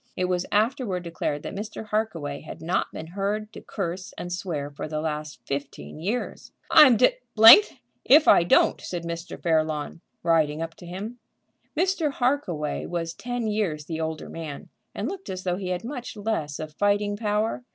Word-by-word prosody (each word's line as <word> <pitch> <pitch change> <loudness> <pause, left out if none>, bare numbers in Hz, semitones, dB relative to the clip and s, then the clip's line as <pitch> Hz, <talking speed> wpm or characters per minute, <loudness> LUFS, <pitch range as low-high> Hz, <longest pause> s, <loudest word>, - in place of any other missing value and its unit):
It 185 - +1
was 180 0 -1
afterward 215 -4 +1
declared 160 -3 -3
that - - -6
Mr. 215 +1 -6
Harkaway 165 -10 -2
had 155 - -9
not 170 +3 -1
been 160 - -7
heard 205 +5 -3
to - - -9
curse 185 -2 -5
and 175 0 -5
swear 155 -6 -4
for 145 - -6
the 155 0 -3
last 150 -3 -4
fifteen 140 +2 -5
years. 210 +9 -3 0.2
"I'm 275 -7 +8
d 250 - +5 0.2
d 225 - +11 0.4
if 300 +3 +6
I - - +8
don't!" 175 - +3
said 175 -2 -5
Mr. 170 +1 -6
Fairlawn, 155 -1 0 0.2
riding 160 -3 +2
up 165 0 -4
to 175 - -12
him. 205 +7 -6 0.6
Mr. 345 -4 +1
Harkaway 245 - -1
was 165 -1 -3
ten 245 -1 -4
years 200 -9 -1
the 160 0 -4
older 160 -1 -4
man, 155 -4 -7 0.3
and - - -2
looked 385 -1 -6
as 185 0 -5
though 180 -1 -1
he 190 -1 -5
had 180 +1 -2
much 250 -2 -6
less 200 -9 -2
of 155 -1 -7
fighting 205 +3 +1
power. 215 +2 -1
180 Hz, 175 wpm, -25 LUFS, 160-220 Hz, 0.6 s, d